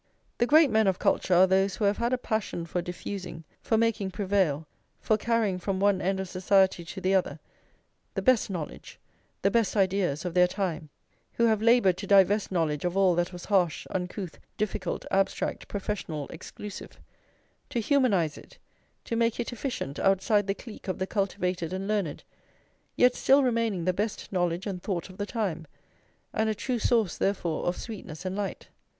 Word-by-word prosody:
The 240 - +3
great 305 -2 +6
men 220 -1 +3
of 190 -1 +2
culture 180 - +2
are 180 +2 +7
those 190 +1 +2
who 210 - -1
have 200 +1 +2
had 235 +1 0
a 255 - +2
passion 220 -8 -2
for 175 +1 -2
diffusing, 180 -1 -6 0.2
for 225 - +1
making 220 -3 +1
prevail, 185 -6 0 0.3
for 215 - +2
carrying 215 -4 0
from 190 +1 -2
one 200 -1 +3
end 190 +1 0
of 190 - -3
society 185 0 +2
to 175 +4 -7
the 190 +1 +1
other, 190 -2 +1 0.8
the - - -2
best 255 -5 +3
knowledge, 170 -6 -6 0.5
the 195 - +3
best 225 0 +1
ideas 185 -5 +1
of 175 - -3
their 180 0 +5
time; 180 -5 -3 0.4
who 235 - +2
have 220 -2 +2
laboured 230 -6 +4
to 195 - -6
divest 200 +1 +4
knowledge 160 -5 0
of 180 +1 -1
all 190 -2 +5
that 175 +1 0
was 175 -1 -9
harsh, 185 -6 +1
uncouth, 180 -1 -4 0.2
difficult, 215 -1 -2
abstract, 195 0 0
professional, 190 -7 -4
exclusive; 200 +4 -9 0.7
to 240 - -1
humanise 210 - +2
it, - - -17 0.5
to 230 - -2
make 230 0 +1
it 240 +1 -3
efficient 235 - -4
outside 195 +1 +2
the 195 - 0
clique 225 -2 -11
of 185 - -2
the 185 - -1
cultivated 185 -4 -2
and 190 +1 -3
learned, 205 -8 -1 0.7
yet 250 0 +5
still 275 +2 +4
remaining 230 -8 0
the 185 - +2
best 210 +3 -3
knowledge 175 -1 0
and 190 -4 -4
thought 185 -2 -3
of 185 - -16
the 205 - -2
time, 185 -9 -3 0.7
and 220 0 +1
a 215 - 0
true 245 +3 -2
source, 225 -4 +1
therefore, 175 -6 -1
of 175 - 0
sweetness 185 -7 -8
and 185 0 -2
light. 205 -1 -4
195 Hz, 180 wpm, -28 LUFS, 180-215 Hz, 0.8 s, are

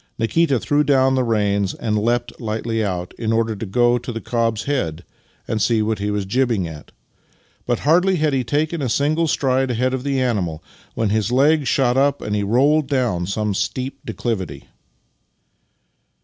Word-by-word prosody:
Nikita 135 +4 +2
threw 145 +4 +1
down 135 -2 +3
the 130 -1 +2
reins 100 -4 0
and 110 -2 -2
leapt 120 +3 0
lightl}'' 115 0 -2
out, 90 -3 -3
in 115 -1 -1
order 115 -1 +1
to 105 - -5
go 120 +4 +2
to 120 +1 -6
the 115 - -4
cob's 115 -2 -1
head 90 - -2 0.4
and 110 -1 -1
see 110 0 +2
what 110 0 -1
he 105 +1 -2
was 105 -1 -1
jibbing 115 -3 0
at; 75 -2 -11 0.8
but 120 -1 0
hardly 180 +6 +3
had 155 -3 +1
he 130 -1 +1
taken 150 +6 -1
a 130 - -1
single 155 +7 +1
stride 135 -3 +1
ahead 125 +2 0
of 130 -1 -3
the 140 -1 0
animal 95 -11 -1 0.3
when 110 -2 0
his 110 +2 0
legs 145 +3 +3
shot 130 -2 +2
up 140 +1 +2
and 105 - -3
he 105 - 0
rolled 135 +8 +2
down 120 -11 0
some 105 +1 -1
steep 125 +7 -3
declivity. 110 -6 -4
120 Hz, 175 wpm, -20 LUFS, 105-135 Hz, 0.8 s, down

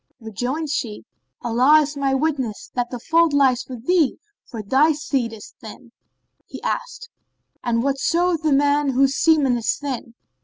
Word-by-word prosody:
Rejoined 250 +7 -4
she, 220 -7 -3 0.4
"Allah 255 +6 +4
is 295 0 -4
my 275 -1 0
witness 270 -7 -2
that 245 -1 -2
the 250 - -5
fault 325 +5 +2
lies 265 -3 +2
with 245 -2 -9
thee, 340 -5 +2 0.3
for 225 -4 -6
that 200 - -22
thy 295 +4 +5
seed 270 -5 -2
is 220 -2 -11
thin." 235 +2 -12 0.6
He - - -9
asked, - - -4 0.5
"And 230 -1 0
what 275 0 -1
showeth 345 +2 +1
the 310 -2 0
man 285 0 +2
whose 270 +1 +2
semen 290 -6 +3
is 230 - -1
thin?" 255 -5 -6
275 Hz, 165 wpm, -21 LUFS, 240-305 Hz, 0.6 s, thy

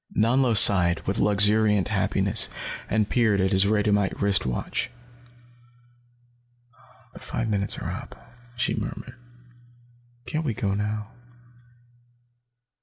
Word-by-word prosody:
Nanlo 120 +2 +2
sighed, 90 -4 +5
with 100 - -2
luxuriant 105 -1 +3
happiness, - - +2 0.4
and 110 -1 0
peered 110 -5 +1
at 95 0 0
his 95 0 +4
radiumite 105 -1 0
wrist 100 -8 0
watch. 65 - -3 2.2
"The - - -12
five 115 - -4
minutes 100 -2 -2
are - - -5
up," - - -9 0.4
she 120 - -1
murmured. 125 - -6 1.1
"Can't 155 +1 -3
we 125 -8 -3
go 100 -1 -2
now?" 105 +2 -4
105 Hz, 110 wpm, -24 LUFS, 100-110 Hz, 2.2 s, sighed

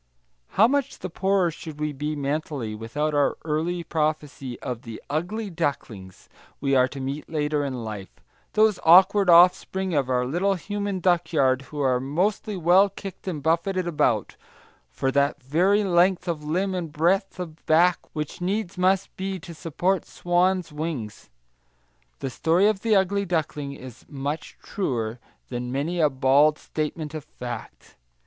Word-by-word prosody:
How 220 - +7
much 280 +1 -1
the 185 - -6
poorer 190 -1 +1
should 155 -2 -9
we 150 -1 -2
be, 150 +2 -3
mentally, 140 -5 -3
without 130 +8 -2
our 145 -1 +2
early 165 +3 -1
prophecy 150 -5 -2
of 125 -2 -5
the 115 -3 -8
"ugly 195 +7 -2
ducklings" 115 - -4 0.3
we 135 -1 0
are 130 0 +5
to 135 +1 -8
meet 135 +3 -5
later 150 -1 0
in 130 -4 -4
life! 105 -3 -6 0.4
those 215 -3 +3
awkward 190 +3 +6
offspring 180 +2 +5
of 140 -4 +1
our 125 -1 +1
little 180 +9 +1
human 200 0 -3
duckyard 160 -7 +2
who 150 -1 -4
are 130 -2 +2
mostly 185 +9 -1
well 180 +4 +5
kicked 195 -1 -9
and 155 -6 -3
buffeted 170 +3 +1
about, 125 - 0 0.5
for 135 - -1
that 140 0 +1
very 185 +10 +2
length 180 0 +3
of 160 -3 -2
limb 185 +6 -1
and 175 -4 -3
breadth 180 +5 +1
of 165 -3 -7
back 170 +3 +4
which 150 +2 -5
needs 190 0 -2
must 190 +1 +1
be, 190 0 -3
to 170 0 -9
support 175 +4 -1
swan's 180 0 0
wings. 150 - -5 0.9
The 135 - -3
story 165 +9 +2
of 210 -2 +2
the 225 -2 +2
ugly 200 +1 +2
duckling 150 -5 -2
is 130 -2 -11
much 145 +2 -5
truer 120 - -2 0.3
than 125 0 -4
many 155 +7 -2
a 155 -2 +4
bald 140 +3 +4
statement 155 0 -4
of 155 -2 -5
fact. 120 -5 -9
160 Hz, 155 wpm, -25 LUFS, 140-185 Hz, 0.9 s, How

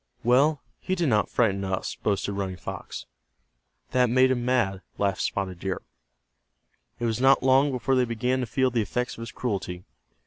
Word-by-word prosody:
"Well, 135 +5 +3 0.2
he 185 - -2
did 170 -5 +1
not 105 -3 +2
frighten 100 -5 +1
us," 95 -1 -2
boasted 100 -1 -1
Running 95 -2 -3
Fox. - - -7 0.9
"That 125 -1 +3
made 130 +2 +4
him 120 -2 0
mad," 120 -7 +1 0.2
laughed 100 -1 0
Spotted 95 -3 -2
Deer. 95 0 -3 1.2
It 120 - -1
was 115 +1 -1
not 135 0 +5
long 135 +2 +5
before 130 +1 0
they 130 -1 +3
began 125 +2 -1
to 125 - -2
feel 130 +3 +1
the 120 -2 +1
effects 125 +4 -2
of - - -10
his 115 - -6
cruelty. 95 -6 -3
120 Hz, 175 wpm, -26 LUFS, 100-130 Hz, 1.2 s, not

